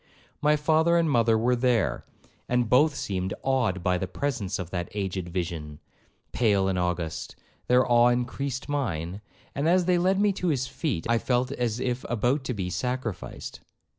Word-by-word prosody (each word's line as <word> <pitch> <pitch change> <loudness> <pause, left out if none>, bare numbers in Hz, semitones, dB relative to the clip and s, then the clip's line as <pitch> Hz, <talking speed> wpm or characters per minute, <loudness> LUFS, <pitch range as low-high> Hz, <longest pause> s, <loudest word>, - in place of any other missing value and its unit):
My 150 0 +4
father 160 +3 +3
and 165 -1 +2
mother 115 -5 +3
were 125 +3 +2
there, 120 -5 +1 0.5
and 125 -1 +2
both 145 +6 +4
seemed 95 -1 -3
awed 120 -9 +1
by 90 0 +1
the - - -2
presence 120 -10 -2
of 90 -3 -6
that 90 -2 -3
aged 95 -3 -3
vision, 85 -4 -4 0.5
pale 100 -5 +2
and 95 -1 0
august; 90 -2 -3 0.3
their 125 +1 +4
awe 120 0 +5
increased 125 +2 -1
mine, 100 - -2 0.3
and 145 +4 0
as 180 0 +3
they 180 -1 +3
led 190 +2 +2
me 205 -1 +3
to 180 - -3
his 135 -6 +1
feet, 135 - -3
I 115 0 +2
felt 125 +2 0
as 120 -4 -1
if 125 0 -2
about 125 +4 +1
to 125 - -2
be 90 -3 -3
sacrificed. 120 -1 -4
120 Hz, 170 wpm, -26 LUFS, 95-140 Hz, 0.5 s, awe